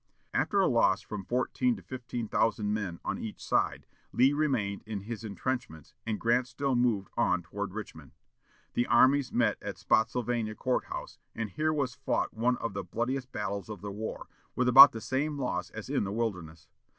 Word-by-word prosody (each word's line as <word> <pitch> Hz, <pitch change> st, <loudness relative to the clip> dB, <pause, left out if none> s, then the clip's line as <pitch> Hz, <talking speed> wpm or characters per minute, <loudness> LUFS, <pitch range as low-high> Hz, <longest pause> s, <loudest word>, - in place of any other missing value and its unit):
After 200 Hz, -, +1 dB
a 195 Hz, -, +4 dB
loss 110 Hz, -5 st, +3 dB
of -, -, -29 dB
from 105 Hz, -3 st, -5 dB
fourteen 130 Hz, -, 0 dB
to -, -, -12 dB
fifteen 120 Hz, -3 st, -5 dB
thousand 105 Hz, -1 st, +1 dB
men 95 Hz, -5 st, -3 dB
on 100 Hz, -, -2 dB
each 110 Hz, -, -6 dB
side, -, -, 0 dB, 0.3 s
Lee 130 Hz, +3 st, +4 dB
remained 130 Hz, -10 st, 0 dB
in 105 Hz, -3 st, -4 dB
his 115 Hz, +2 st, -6 dB
intrenchments 105 Hz, -, -4 dB
and 110 Hz, -2 st, -1 dB
Grant 120 Hz, +2 st, +2 dB
still 130 Hz, +2 st, -1 dB
moved 115 Hz, -6 st, +1 dB
on 90 Hz, -1 st, +1 dB
toward 100 Hz, +3 st, -5 dB
Richmond. 80 Hz, -10 st, -8 dB, 0.6 s
The 120 Hz, -, +1 dB
armies 130 Hz, +2 st, +4 dB
met -, -, +1 dB
at -, -, -6 dB
Spottsylvania 115 Hz, -1 st, 0 dB
Court 130 Hz, +2 st, 0 dB
House, -, -, -7 dB, 0.2 s
and 115 Hz, -3 st, -3 dB
here 155 Hz, +9 st, 0 dB
was 140 Hz, -5 st, -1 dB
fought -, -, -1 dB
one 125 Hz, +2 st, +1 dB
of 115 Hz, -, -4 dB
the 100 Hz, -, -3 dB
bloodiest 125 Hz, +7 st, -3 dB
battles 100 Hz, -1 st, -4 dB
of 105 Hz, -4 st, -7 dB
the 100 Hz, 0 st, -5 dB
war, 110 Hz, +2 st, -6 dB, 0.3 s
with 125 Hz, -, +1 dB
about 135 Hz, +3 st, +11 dB
the 115 Hz, -, -7 dB
same 145 Hz, +5 st, -1 dB
loss 95 Hz, -9 st, -2 dB
as 110 Hz, -, -8 dB
in 135 Hz, -3 st, 0 dB
the 95 Hz, -, -3 dB
Wilderness. 90 Hz, -8 st, -4 dB
115 Hz, 185 wpm, -30 LUFS, 100-130 Hz, 0.6 s, about